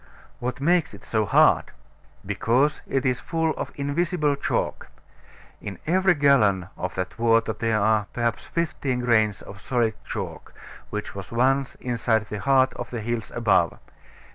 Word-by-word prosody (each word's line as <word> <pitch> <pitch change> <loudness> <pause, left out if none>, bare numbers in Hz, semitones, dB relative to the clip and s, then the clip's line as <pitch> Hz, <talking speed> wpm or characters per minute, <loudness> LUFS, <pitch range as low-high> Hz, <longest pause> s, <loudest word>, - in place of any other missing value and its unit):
What 125 +1 -3
makes 165 +1 +2
it - - -15
so 110 -2 0
hard? - - +5 0.6
Because 120 +8 +1
it 135 0 -1
is 125 -2 +1
full 160 +1 -1
of - - -5
invisible 150 +1 0
chalk. 140 - -2 0.7
In 100 - -6
every 185 +2 +3
gallon 105 - +3
of 90 - -4
that 95 +3 -4
water 115 -1 +3
there 110 0 0
are, 105 -1 +2
perhaps, 120 -1 -1
fifteen 140 -6 -2
grains 110 -5 +2
of 100 +1 -11
solid 120 -4 0
chalk, - - -6 0.3
which 105 0 -5
was 100 -2 -8
once 130 +3 +1
inside 115 -3 0
the 105 - -4
heart 130 +2 +3
of 120 - -7
the 120 -2 -4
hills 115 0 -3
above. 100 -8 +2
120 Hz, 150 wpm, -24 LUFS, 110-140 Hz, 0.7 s, hard